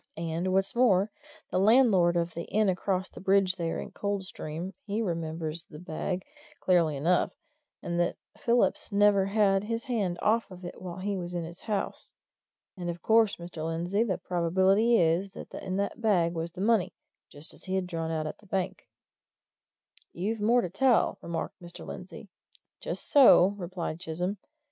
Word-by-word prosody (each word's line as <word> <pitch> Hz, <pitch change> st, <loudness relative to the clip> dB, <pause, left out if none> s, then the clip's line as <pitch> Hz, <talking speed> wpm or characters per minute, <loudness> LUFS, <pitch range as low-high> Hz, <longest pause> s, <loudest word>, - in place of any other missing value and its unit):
And 165 Hz, +2 st, -2 dB
what's 195 Hz, +3 st, +1 dB
more, 215 Hz, -5 st, +4 dB, 0.4 s
the 185 Hz, -, +1 dB
landlord 195 Hz, -5 st, +5 dB
of 170 Hz, -1 st, -1 dB
the 170 Hz, -, -5 dB
inn 215 Hz, -1 st, +2 dB
across 185 Hz, 0 st, -1 dB
the -, -, -12 dB
bridge 190 Hz, -1 st, +2 dB
there 165 Hz, -2 st, -2 dB
at -, -, -7 dB
Coldstream 190 Hz, -3 st, -4 dB
he 205 Hz, +2 st, -1 dB
remembers 165 Hz, -4 st, -3 dB
the 150 Hz, -, -12 dB
bag, 180 Hz, +3 st, -4 dB, 0.3 s
clearly 170 Hz, -5 st, +2 dB
enough, 170 Hz, +6 st, +2 dB, 0.5 s
and 170 Hz, 0 st, -2 dB
that 175 Hz, -, 0 dB, 0.2 s
Phillips 235 Hz, -1 st, +1 dB
never 200 Hz, -1 st, +4 dB
had 200 Hz, -1 st, +2 dB
his 230 Hz, +1 st, -2 dB
hand 210 Hz, -9 st, -1 dB
off 225 Hz, +2 st, +2 dB
it 180 Hz, -1 st, -9 dB
while 180 Hz, -1 st, -6 dB
he 200 Hz, +2 st, -2 dB
was 175 Hz, -1 st, -5 dB
in 170 Hz, -, -2 dB
his 170 Hz, +2 st, -9 dB
house. 210 Hz, -3 st, -3 dB, 0.6 s
And 175 Hz, -2 st, -4 dB
of 170 Hz, 0 st, -6 dB
course, 225 Hz, -2 st, +4 dB
Mr. 170 Hz, -2 st, -7 dB
Lindsey, 170 Hz, +5 st, -1 dB
the 200 Hz, -6 st, -1 dB
probability 190 Hz, +6 st, +2 dB
is 170 Hz, +3 st, +2 dB
that -, -, -10 dB
in 185 Hz, -1 st, -4 dB
that 200 Hz, +3 st, -2 dB
bag 180 Hz, -7 st, +2 dB
was 165 Hz, 0 st, -4 dB
the 185 Hz, -, -7 dB
money 215 Hz, -2 st, +2 dB, 0.3 s
just 145 Hz, +2 st, -9 dB
as -, -, -13 dB
he 190 Hz, 0 st, -2 dB
had 190 Hz, -1 st, 0 dB
drawn 165 Hz, -2 st, -3 dB
it 165 Hz, -, -1 dB
out 155 Hz, -1 st, -2 dB
of 155 Hz, -, -6 dB
the 210 Hz, -, -20 dB
bank." 190 Hz, -1 st, -3 dB, 1.3 s
"You've 205 Hz, +5 st, -2 dB
more 235 Hz, +4 st, +4 dB
to 180 Hz, -, -3 dB
tell," 245 Hz, +4 st, +2 dB
remarked 170 Hz, +1 st, -5 dB
Mr. 175 Hz, 0 st, -10 dB
Lindsey. 185 Hz, +3 st, -9 dB, 0.5 s
"Just -, -, -4 dB
so," 260 Hz, -9 st, +7 dB
replied 175 Hz, -3 st, -5 dB
Chisholm. 180 Hz, +4 st, -3 dB
185 Hz, 170 wpm, -28 LUFS, 170-205 Hz, 1.3 s, so